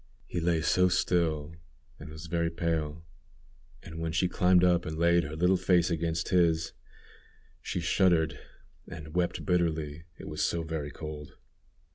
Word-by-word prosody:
He 85 - -4
lay 85 -1 +1
so 90 +3 +3
still, 80 -4 0 0.5
and 80 - -9
was 80 +2 -9
very 85 0 0
pale; 80 -2 -2 0.8
and 80 0 -8
when 80 0 -2
she 90 +3 +1
climbed 90 0 +3
up 90 -1 +3
and 80 0 -5
laid 85 +1 +3
her 75 +2 -6
little 90 +3 +3
face 90 -1 +2
against 85 0 -1
his, 85 -2 +2 0.9
she 90 - -3
shuddered 80 -4 +2 0.5
and 80 -3 -9
wept 90 0 -1
bitterly, 80 -4 -1
it - - -10
was - - -2
so 85 -1 0
very 80 -2 -4
cold. 75 -1 -8
85 Hz, 150 wpm, -29 LUFS, 80-85 Hz, 0.9 s, so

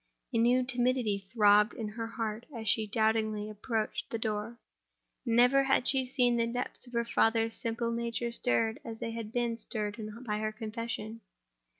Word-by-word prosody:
A 230 - +2
new 245 +2 +4
timidity 245 -4 +1
throbbed 210 -1 +5
in 220 -2 -4
her 225 +2 -5
heart 225 0 -4
as 225 -4 -6
she 215 +1 +2
doubtingly 220 -1 +1
approached 215 +1 -3
the 230 - -2
door. 220 +1 -3 0.7
Never 245 +4 +5
had 270 -2 +2
she 265 -2 +2
seen 245 -2 +2
the 230 0 +2
depths 245 +2 -4
of 245 - -14
her 235 0 +1
father's 225 -1 +2
simple 230 0 -1
nature 235 0 -2
stirred 230 -1 +1
as 225 -1 -6
they 230 - -4
had 225 -2 -6
been 235 -1 0
stirred 215 -1 -4 0.2
by 210 -2 -1
her 215 0 -1
confession. 225 0 -5
230 Hz, 170 wpm, -31 LUFS, 215-240 Hz, 0.7 s, throbbed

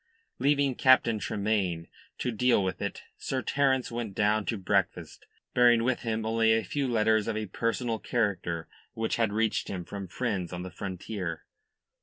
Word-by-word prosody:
Leaving 140 0 +3
Captain 125 -3 +4
Tremayne 100 -5 -1 0.3
to 125 - -1
deal 120 -2 +3
with 95 -1 -3
it, - - -4 0.2
Sir 130 -1 -2
Terence 135 -3 +1
went 115 -4 -4
down 105 0 +2
to 115 - 0
breakfast, 95 - -1 0.3
bearing 120 -2 +5
with 130 0 +1
him 110 -1 -2
only 115 0 +3
a 115 0 +2
few 140 +8 -2
letters 110 -2 +2
of 110 -1 -1
a 110 - -2
personal 115 +3 -1
character 90 -8 -1 0.3
which 115 0 -1
had 115 -3 +2
reached 110 +1 0
him 90 -3 -5
from 100 0 -6
friends 100 -4 -2
on 90 0 -5
the 90 - -7
frontier. 95 -3 -5
110 Hz, 165 wpm, -29 LUFS, 100-120 Hz, 0.3 s, bearing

